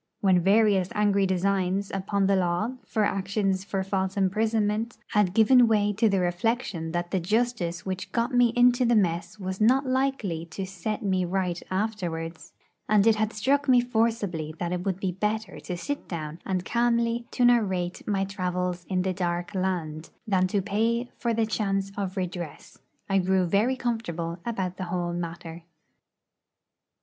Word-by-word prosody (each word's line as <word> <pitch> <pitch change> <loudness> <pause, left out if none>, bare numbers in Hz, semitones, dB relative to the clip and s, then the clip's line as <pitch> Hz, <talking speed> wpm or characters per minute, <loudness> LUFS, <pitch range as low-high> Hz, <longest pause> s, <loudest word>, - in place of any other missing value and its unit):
When 190 -3 +4
various 195 -1 +3
angry 200 -2 +3
designs 190 +1 0
upon 195 +1 0
the 195 0 +3
law, 185 +5 0 0.2
for 215 - 0
actions 195 -1 0
for 195 -1 -2
false 190 0 -2
imprisonment, 215 +3 0
had 205 -4 +2
given 240 +2 +6
way 210 -2 +2
to 215 +2 +2
the 195 -1 +2
reflection 175 -2 -1
that 175 +1 -2
the 190 - +1
justice 185 -3 -1
which 190 -1 -4
got 235 +2 0
me 245 -1 +4
into 245 +1 +5
the 240 -1 +3
mess 175 -2 0
was 190 +1 -4
not 260 +6 +4
likely 255 -11 -1
to 190 +4 -5
set 195 +5 -4
me 190 -2 +1
right 180 -1 -1
afterwards, 175 -5 -3 0.4
and 210 -1 +4
it 225 -1 +5
had 215 0 0
struck 275 +7 +1
me 250 -1 +7
forcibly 220 -10 -1
that 175 +1 -3
it 180 0 -2
would 190 -2 -1
be 190 -2 -1
better 210 +4 -2
to 180 - -5
sit 285 +10 -4
down 160 -2 -5
and 185 -1 -1
calmly 235 0 +1
to 245 - +1
narrate 190 -7 +1
my 195 -2 +1
'travels 180 -2 -3
in 185 -1 +1
the 190 0 0
dark 175 +1 -2
land' 170 -5 -2 0.2
than 190 -4 +2
to 195 +1 0
pay 230 +4 0
for 235 - 0
the 225 0 +1
chance 195 -3 -1
of 195 -1 -4
redress, 175 -4 -5 0.3
I 195 -1 +2
grew 185 0 +2
very 210 +9 +2
comfortable 175 -9 -3
about 190 -6 -2
the 185 - -4
whole 175 -1 -2
matter. 170 -1 -6
195 Hz, 165 wpm, -26 LUFS, 180-220 Hz, 0.4 s, me